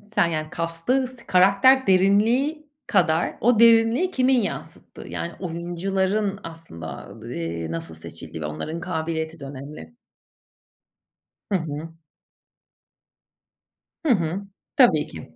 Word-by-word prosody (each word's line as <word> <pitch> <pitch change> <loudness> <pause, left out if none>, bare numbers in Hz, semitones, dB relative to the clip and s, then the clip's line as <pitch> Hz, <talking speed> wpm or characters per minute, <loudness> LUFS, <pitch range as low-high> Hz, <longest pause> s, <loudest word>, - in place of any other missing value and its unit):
Sen - - +4
yani 155 -2 -2
cast'ı 165 +11 0
s 255 -1 -8
karakter 200 +8 +5
derinliği 230 - +3 0.2
kadar 160 +2 +2
o 235 -1 +4
derinliği 230 +9 +5
kimin 255 -3 +3
yansıttığı. 200 - -6
Yani 170 - -4
oyuncuların 190 +4 -1
aslında 85 - -8
d 115 +2 -7 0.2
eee, 80 0 -4
nasıl 80 -1 -4
seçildiği 80 0 -8
ve 75 - -3
onların 80 - -4
kabiliyeti 160 -2 -3
de 140 - -8
önemli. 140 - -9 1.6
Hı - - +3
hı. 160 -1 -6 2.1
Hı 305 - +2
hı, 175 -1 -1 0.3
tabii 235 - +5
ki. 80 - -11
175 Hz, 115 wpm, -24 LUFS, 160-225 Hz, 2.1 s, karakter